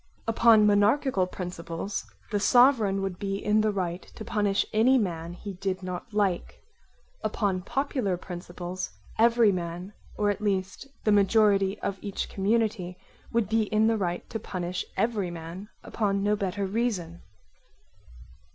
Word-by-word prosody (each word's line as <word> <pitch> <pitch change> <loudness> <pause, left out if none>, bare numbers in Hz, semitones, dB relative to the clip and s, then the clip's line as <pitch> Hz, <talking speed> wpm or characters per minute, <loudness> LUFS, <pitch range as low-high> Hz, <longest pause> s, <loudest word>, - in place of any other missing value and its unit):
Upon 225 -1 +6
monarchical 205 0 +3
principles, 180 +1 -5 0.2
the 205 - +1
Sovereign 225 -4 +4
would 190 -2 -4
be 195 -1 -2
in 210 +2 +2
the 215 - +2
right 180 -3 -2
to 220 - -8
punish 205 -3 +1
any 240 +5 +5
man 170 -6 -2
he 200 +3 -7
did 190 0 -3
not 180 +5 -6
like; 200 -4 -1 0.6
upon 195 -4 0
popular 245 -4 -1
principles, 175 +1 -6 0.3
every 230 -1 +5
man, 175 +2 -4 0.2
or 205 -1 +2
at 205 +1 -5
least 195 +4 -2 0.2
the 215 - +3
majority 200 -1 +4
of 195 -1 -3
each 200 -2 -4
community, 200 -3 0 0.3
would 230 -3 +1
be 220 +1 +2
in 215 +1 +2
the 225 0 +3
right 175 -4 -2
to 225 - -3
punish 180 -2 -4
every 220 -5 0
man 170 +4 -8
upon 200 -3 -1
no 210 +1 +2
better 200 0 -2
reason. 190 -5 -2
200 Hz, 140 wpm, -27 LUFS, 185-215 Hz, 0.6 s, Upon